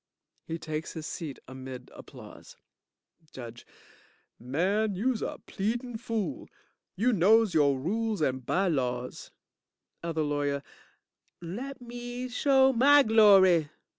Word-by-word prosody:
(He 165 - -3
takes 155 0 -5
his 160 -2 -7
seat 150 -5 -6
amid 130 -1 -9
applause) - - -13 0.8
JUDGE 120 -2 -10 0.7
Man, 190 - 0
youse 235 +4 -1
a - - -4
pleadin' 230 +3 -3
fool. 230 +7 -4 0.5
You 235 +6 +2
knows 210 +2 +4
yo' 145 -3 +4
rules 215 +10 -2
and 130 -4 -1
by 190 +10 +1
laws. 125 -5 -2 0.7
OTHER 165 -2 -1
LAWYER 145 -1 -1 0.8
Let 245 +11 -7
me 245 +1 -6
show 265 +1 +3
my 285 +4 +6
glory. 195 - +5
190 Hz, 110 wpm, -28 LUFS, 145-230 Hz, 0.8 s, my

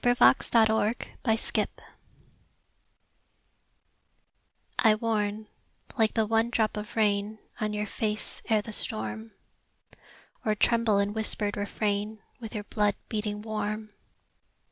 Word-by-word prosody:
THE 245 0 +4
VOICE 245 - +7 0.2
OF 220 0 +4 0.3
THE 225 -2 0
VOID - - -1 3.0
I 220 -2 +5
warn, 215 -1 -1 0.5
like 220 -4 +2
the 220 - +3
one 225 +2 +2
drop 220 -2 0
of 210 0 -6
rain 210 -1 +1 0.2
On 215 -1 -1
your 210 0 -2
face, 210 +1 -3
ere 215 -2 +3
the 220 - -7
storm; 110 - 0 1.1
Or 215 - +1
tremble 230 -1 +3
in 200 +1 +1
whispered 210 -1 +3
refrain 205 +1 -2 0.2
With 225 -1 -8
your 210 - -3
blood, 205 0 0
beating 210 -1 -3
warm. 215 0 -4
215 Hz, 120 wpm, -28 LUFS, 205-220 Hz, 3.0 s, VOICE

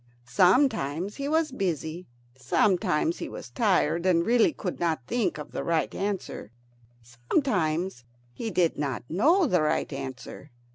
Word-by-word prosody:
Sometimes 185 - +2
he 280 0 -3
was 315 -1 +1
busy; 175 - -3 0.3
sometimes 185 - +1
he - - -5
was - - -9
tired, 175 - +1
and 175 -2 +3
really 240 +5 +4
could 185 - -5
not 160 -7 -1
think 235 - -1
of 150 - -8
the - - -4
right 165 -2 0
answer; 195 - -4 0.5
sometimes 155 - -1 0.3
he 225 - -4
did 175 -6 +1
not 140 -4 -2
know 315 - +3
the 180 - +2
right 155 -1 0
answer. 135 +1 -7
180 Hz, 140 wpm, -27 LUFS, 150-220 Hz, 0.5 s, really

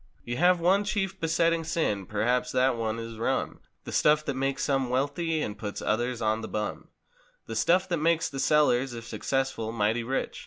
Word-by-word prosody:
You 120 0 -3
have 180 +1 +4
one 190 +4 +3
chief 200 -2 -2
besetting 165 0 +1
sin—perhaps 125 - 0
that 130 0 +3
one 115 -1 -2
is 115 -1 -7
"rum," 130 +3 -1 0.2
The - - -7
stuff 150 0 +3
that 140 - -1
makes 135 +1 -1
some 135 -3 0
wealthy 150 +5 0
and 105 - -4
puts 105 -1 -5
others 120 +2 -1
on 110 +1 +1
the 110 - -5
bum; 105 0 -4 0.6
The 115 - -6
stuff 175 +11 +3
that 175 - +1
makes 165 +1 +2
the 135 -3 -6
sellers, 135 -4 +3
if 115 0 -8
successful, 135 -3 -2
mighty 115 +1 0
rich. 130 +3 -3
130 Hz, 185 wpm, -27 LUFS, 115-160 Hz, 0.6 s, have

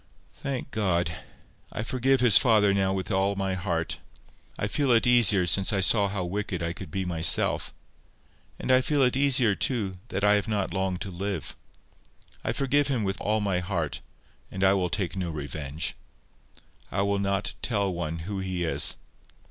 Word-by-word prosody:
"Thank 135 -1 -5
God. 85 -5 0 0.6
I 105 - -4
forgive 130 +2 +1
his 120 -5 +6
father 105 -5 +5
now 95 -1 +1
with 95 +2 -3
all 95 +1 +1
my 95 -1 -1
heart. 90 -3 -2 0.6
I - - -1
feel 135 +7 0
it 115 -2 +4
easier 115 -6 +5
since 95 +2 +2
I 100 -2 0
saw 100 +2 +3
how 95 -2 -3
wicked 95 -1 -3
I 85 +1 -2
could 95 - -9
be 95 -1 -3
myself. 85 -2 +1 0.9
And - - -2
I 130 0 +6
feel 145 +1 +1
it 125 0 +2
easier, 130 -5 +3
too, 105 -2 -1
that 100 -4 -4
I 105 0 +5
have 105 +2 +1
not 105 -3 -1
long 95 -1 -1
to 95 - -6
live. 95 -2 -4 0.9
I - - -1
forgive 140 +1 +1
him 130 -6 0
with 95 -1 -3
all 110 +1 0
my 100 -3 0
heart, 85 -4 -3 0.5
and 95 0 -4
I 95 0 +5
will 90 -2 0
take 90 0 -2
no 90 -2 -3
revenge. 75 0 -4 1.0
I 100 +2 0
will 100 0 0
not 100 0 -1
tell 100 -5 0
one 85 -1 -4
who 100 0 -4
he 95 -2 -3
is. 80 - +2
100 Hz, 180 wpm, -26 LUFS, 90-110 Hz, 1.0 s, his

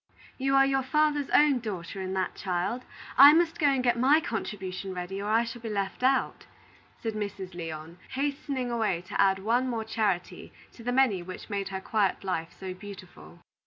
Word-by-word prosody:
"You 270 +1 +1
are 270 0 +6
your 270 0 +1
father's 295 +1 +1
own 290 -3 +5
daughter 195 -4 -5
in 190 0 -3
that, 190 -1 -1
child. 190 +6 -2 0.4
I 285 +2 +11
must 330 0 +2
go 300 - +4
and 270 -2 +2
get 240 -1 +2
my 275 +5 +5
contribution 190 -7 -4
ready, 180 +2 -4
or 205 - -3
I 225 +2 +4
shall 235 0 -7
be 225 - -5
left 200 0 -3
out," 265 +1 +1 0.6
said 225 -1 -2
Mrs. 200 -3 -5
Lyon, 165 0 -7
hastening 275 -2 -2
away 215 -7 0
to - - +1
add 195 -1 +4
one 235 +6 +1
more 230 -2 -2
charity 210 -5 -2 0.2
to 230 - -13
the 245 - -1
many 245 -8 +3
which 185 +4 -9
made 200 -1 -2
her 190 -1 -4
quiet 205 -2 0
life 165 -4 -2
so 190 -1 -5
beautiful. 185 - -12
215 Hz, 190 wpm, -28 LUFS, 190-260 Hz, 0.6 s, I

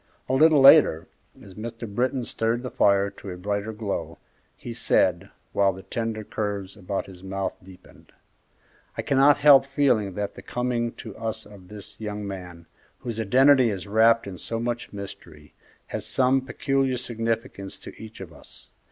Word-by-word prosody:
A - - -1
little 155 +1 +5
later, 135 - +7 0.4
as 100 - -13
Mr. 115 +3 -7
Britton 125 +5 -1
stirred 115 +1 -1
the 125 - -5
fire 100 0 +3
to 100 - -10
a 90 - -6
brighter 100 +3 -3
glow, 105 -2 -4 0.4
he - - -7
said, - - +2 0.2
while 100 -1 +3
the 95 +1 -11
tender 115 -2 -3
curves 100 -2 -4
about 100 0 -4
his 90 -2 -13
mouth 95 0 -3
deepened, 95 -1 -17 0.9
"I - - -2
cannot 140 +1 +4
help 145 -2 +7
feeling 130 -9 +1
that 105 -1 -3
the - - -11
coming 120 -1 -2
to 110 -4 -10
us 110 0 -4
of 100 -3 -15
this 105 +1 -10
young 105 -1 -4
man, 90 -3 -8 0.3
whose 115 -2 -6
identity 130 +3 +5
is 100 -3 -4
wrapped 110 +2 +4
in 95 -2 -8
so 115 - -3
much 120 0 -3
mystery, 95 -7 -10 0.3
has - - -5
some 130 +1 +2
peculiar 135 0 -1
significance 115 -4 -4
to - - -11
each 110 -2 -10
of 85 -3 -9
us. - - -13
110 Hz, 165 wpm, -25 LUFS, 100-125 Hz, 0.9 s, later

